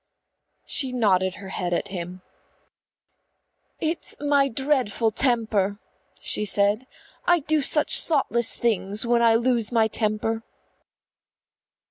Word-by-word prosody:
She 265 -3 0
nodded 190 -6 +1
her 195 -1 -10
head 175 -2 -2
at - - -3
him. 180 -1 -7 1.6
"It's 320 +1 -3
my 285 -1 +2
dreadful 255 -4 0
temper," 220 -5 0 0.4
she - - +2
said. 205 +4 +2 0.4
"I 350 -2 +4
do 305 +1 0
such 300 +2 +2
thoughtless 240 -7 +2
things 210 -2 -1
when 235 0 +2
I 230 -1 +4
lose 235 -1 0
my 225 -2 +3
temper." 220 +1 -1
225 Hz, 110 wpm, -24 LUFS, 205-260 Hz, 1.6 s, I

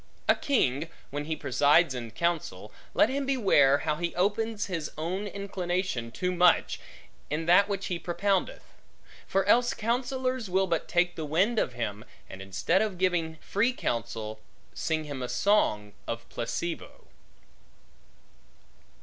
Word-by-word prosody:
A - - +7
king, 160 - 0 0.2
when 145 +1 -3
he 160 +1 -2
presides 150 +1 +3
in 120 -2 -5
counsel, 115 - -2 0.2
let - - +5
him 275 +2 -2
beware 190 - +4
how 150 -1 0
he 175 +1 -3
opens 210 +3 0
his 165 -5 -3
own 185 +6 -2
inclination 185 -10 -3
too 180 +10 -2
much, 180 -1 +3 0.5
in 155 +2 -2
that 180 +4 +5
which 195 -1 -2
he 175 -2 -2
propoundeth; 190 +3 -1 0.6
for 195 0 +1
else 240 +4 +4
counsellors 250 0 -1
will 190 +1 +2
but 170 -3 -1
take 175 0 +1
the 160 - -4
wind 185 +10 +2
of 125 - -1
him, 110 -3 -4 0.2
and 95 - -9
instead 95 - +1
of 210 -4 -1
giving 175 -3 0
free 230 +6 +1
counsel, 115 - -3 0.3
sing 160 -1 -1
him 145 -3 -6
a 125 - -3
song 105 - +2
of 115 0 -4
placebo. 160 +8 -4
175 Hz, 140 wpm, -28 LUFS, 140-200 Hz, 0.6 s, A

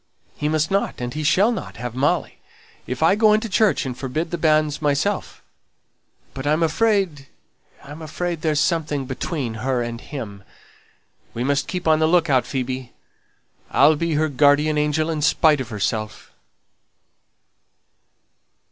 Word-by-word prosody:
He 150 - -2
must 155 +1 0
not, 195 +1 -1
and 120 0 -4
he 155 - -4
shall 190 +9 +3
not, 230 - -6
have 120 -1 -5
Molly, 135 +4 -1 0.5
if 125 +4 -3
I 165 - +5
go 215 +1 +4
into 215 +2 +1
church 215 -4 +2
and 130 -2 -4
forbid 155 +6 -3
the 175 - -2
banns 155 -2 +2
myself; 150 +7 -1 0.9
but 135 +1 -5
I'm 155 +3 +2
afraid 175 -5 +1 0.6
I'm 145 +3 -10
afraid 170 +1 -4
there's 155 -2 +1
something 155 -5 0
between 130 -1 -4
her 130 -1 0
and 120 0 -6
him. 105 -9 -8 0.9
We 120 - -2
must 140 +1 0
keep 180 -2 -4
on 155 -1 +4
the 160 - +3
look 170 -2 +2
out, 130 -2 +2
Phoebe. 130 -1 -4 0.8
I'll 150 +3 +5
be 165 +1 -1
her 155 +1 +2
guardian 145 +2 +3
angel, 150 +1 +1
in 155 -2 -3
spite 150 -1 +3
of 125 - -6
herself." 110 0 -3
150 Hz, 150 wpm, -22 LUFS, 130-165 Hz, 0.9 s, I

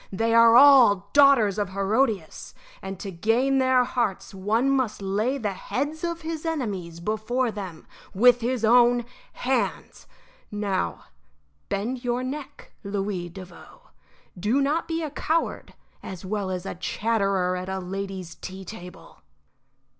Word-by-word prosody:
They 225 +4 0
are 230 0 +7
all 240 -8 +6
daughters 270 -8 +5
of 205 -2 -1
Herodias, 200 -2 -1 0.3
and 190 -1 -7
to 195 - -6
gain 235 +9 +1
their 260 -1 +4
hearts 235 -7 -2
one 210 +7 0
must 260 -5 0
lay 210 +7 -1
the 210 -6 -2
heads 295 - -4
of 340 -1 -3
his 320 -1 -5
enemies 205 - -4
before 220 +6 -1
them 190 -7 -8 0.3
with 245 +4 +5
his 240 -1 0
own 240 +1 +4 0.3
hands. 260 +1 -2 0.4
Now, 195 - -2 0.7
bend 240 +6 -3
your 245 0 -1
neck, 275 +2 -7
Louis 200 -3 -3
Devoe. 190 - -13 0.5
Do 210 +9 0
not 295 +4 0
be 330 0 -2
a 305 - -4
coward 320 +3 -2 0.3
as 185 -1 -8
well 200 0 -2
as 185 0 -4
a - - -4
chatterer 195 -1 0
at 185 +1 -5
a 190 - -2
lady's 190 -2 -5
tea 190 +3 -9
table." 180 - -11
215 Hz, 140 wpm, -25 LUFS, 190-255 Hz, 0.7 s, are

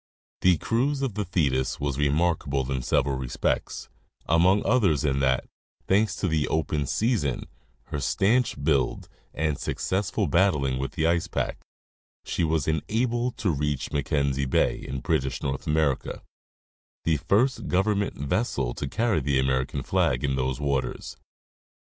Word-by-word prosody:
The 90 -2 +5
cruise 135 - 0
of 130 -6 -1
the 105 +1 -2
Thetis 70 -8 0
was 70 -1 -2
remarkable 70 -3 +1
in 65 -1 -1
several 65 +1 +1
respects, 65 -2 -2 0.4
among 90 +5 +3
others 95 - +3
in 70 -2 +1
that, 65 -2 +1 0.4
thanks 105 +3 +2
to 95 - -1
the 80 -3 +1
open 75 -2 -1
season, 105 - 0 0.4
her 75 - -5
stanch 110 - +1
build, 65 -3 +1 0.2
and 75 -2 -1
successful 100 +2 -1
battling 75 -6 +2
with 70 - -3
the 80 - 0
ice 85 +1 +2
pack, 65 -6 -2 0.7
she - - -1
was 80 -3 0
enabled 120 - 0
to 100 -5 +1
reach 75 -2 -2
Mackenzie 70 -2 0
bay, - - +2
in 65 -1 -5
British 65 +2 -1
North 65 -1 -3
America, 75 -3 0 0.8
the 80 -2 +2
first 120 - +1
government 100 +2 +1
vessel 70 - -1
to 70 - -4
carry 110 - +1
the 70 0 0
American 65 +2 0
flag 80 -9 +1
in 70 -2 +1
those 65 +1 -1
waters. 70 -3 -2
75 Hz, 140 wpm, -26 LUFS, 70-95 Hz, 0.8 s, The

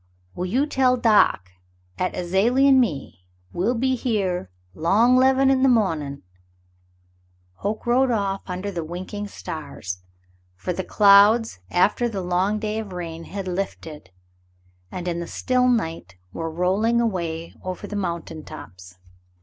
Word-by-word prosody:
"Well, 180 - -3
you 255 +10 +1
tell 260 -3 +2
doc 210 - +3 0.5
'at 185 - -1
Azalie 205 +10 +2
an' 270 -1 +6
me, 145 - -2 0.3
we'll 215 +8 0
be 260 +3 +1
here 195 - -1 0.2
'long 215 - +3
'leven 265 +1 +4
in 265 -1 +2
the 265 - +5
mawnin'." 160 - 0 1.3
Hoke 210 +2 -4
rode 255 +2 +3
off 200 -4 -1
under 185 +2 -4
the 170 -3 -4
winking 185 +5 -6
stars, 140 - -7 0.6
for 180 - -4
the 190 - -3
clouds 205 - +5
after 210 +6 +2
the 195 -4 -4
long 180 +4 +1
day 215 0 -2
of 205 -4 -7
rain 165 -2 -6
had 195 -1 -6
lifted, 180 -4 -5 0.8
and 180 -1 -5
in 170 -1 -2
the 170 - -5
still 250 0 +1
night 165 - -1 0.2
were 165 0 -4
rolling 190 +8 +1
away 170 -7 -2
over 185 -1 -5
the 210 - -6
moun 170 -4 -2
tain 155 -1 -9
tops. 90 0 -12
195 Hz, 145 wpm, -23 LUFS, 170-230 Hz, 1.3 s, an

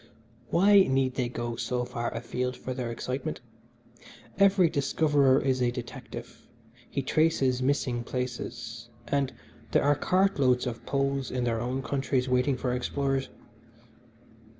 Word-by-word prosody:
Why 200 +3 +6
need 135 -5 +2
they 125 -2 -1
go 120 -1 -4
so 125 0 -1
far 120 -1 -3
afield 125 +2 -3
for 130 - -5
their 125 -2 -3
excitement? 125 +3 -4 1.0
Every 195 -2 +5
discoverer 145 -2 +3
is 130 -2 0
a 125 - +3
detective. 120 0 -8 0.4
He 140 - -2
traces 135 -4 +2
missing 125 -3 0
places, 125 0 -5 0.2
and 140 -2 0 0.4
there - - +4
are 145 - +5
cartloads 145 -8 +2
of 120 -2 -5
Poles 140 -1 0
in 125 -1 -2
their 115 -2 0
own 130 +2 -2
countries 135 -2 0
waiting 125 +1 +2
for 125 -1 -1
explorers. 135 +2 -1
130 Hz, 130 wpm, -28 LUFS, 125-140 Hz, 1.0 s, Why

